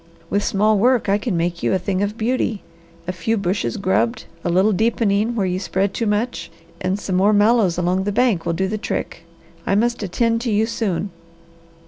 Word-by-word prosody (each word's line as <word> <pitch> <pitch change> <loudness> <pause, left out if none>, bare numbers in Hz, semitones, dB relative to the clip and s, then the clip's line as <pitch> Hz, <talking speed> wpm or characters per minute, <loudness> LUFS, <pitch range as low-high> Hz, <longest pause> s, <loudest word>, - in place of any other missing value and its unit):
With 200 0 +1
small 210 +1 +2
work 245 -1 +3
I 200 +1 +3
can 210 -5 -2
make 175 +1 -1
you - - +1
a - - +3
thing 185 +1 -2
of 205 +2 -2
beauty. 225 -2 -1 0.4
A - - 0
few 220 +5 -1
bushes 200 +3 -1
grubbed, 210 +5 0 0.2
a - - -1
little 190 +5 +3
deepening 220 +1 +1
where 205 -4 0
you 180 0 -1
spread 195 +1 -1
too 230 - -1
much, 210 +4 -1 0.3
and 185 +1 0
some 190 -2 -3
more 200 +3 +4
mallows 205 -4 +3
along 180 +2 0
the 205 - 0
banks 225 -5 +2
will 170 - -1
do 190 +3 0
the 215 +2 -3
trick. 170 - -4 0.4
I 195 - 0
must 235 +3 +1
attend 230 +4 0
to 235 -2 -1
you 215 +1 +2
soon." 205 -4 -2
205 Hz, 200 wpm, -20 LUFS, 185-225 Hz, 0.4 s, more